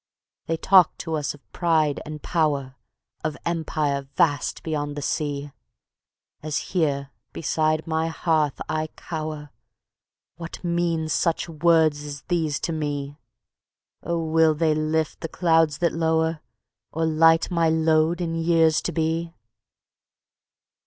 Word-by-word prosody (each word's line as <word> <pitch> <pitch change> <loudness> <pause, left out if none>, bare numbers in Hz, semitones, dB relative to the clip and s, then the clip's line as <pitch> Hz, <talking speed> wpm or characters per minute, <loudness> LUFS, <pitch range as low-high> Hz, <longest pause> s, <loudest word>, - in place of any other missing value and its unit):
They 165 0 0
talk 185 0 +5
to 165 - -5
us 150 -2 -2
of 145 - -24
pride 160 -4 +1
and 150 -1 -7
power, 145 -6 0 0.5
Of 155 -1 -2
Empire 150 -4 -1
vast 145 -2 +1
beyond 145 -2 -3
the 145 - -4
sea; 145 -1 -2 0.9
As 150 -1 -2 0.2
here 140 -6 0 0.2
beside 155 0 0
my 160 0 0
hearth 160 -3 0
I 155 0 -1
cower, 155 -3 -6 0.9
What 170 +1 -8
mean 170 -2 0
such 165 +2 0
words 160 -2 +3
as 145 -2 -7
these 160 -5 -1
to - - -2
me? 145 -2 -3 0.8
Oh, 170 -1 -2
will 160 0 +3
they 155 0 +2
lift 155 0 -1
the 165 - -4
clouds 160 -4 +2
that 170 +1 +1
low'r, 160 0 +1 0.5
Or 160 +1 -1
light 165 +2 +4
my 165 -2 +2
load 160 +1 +2
in 165 -1 -2
years 165 -1 +3
to - - -2
be? 165 +1 -1
160 Hz, 130 wpm, -24 LUFS, 150-165 Hz, 0.9 s, talk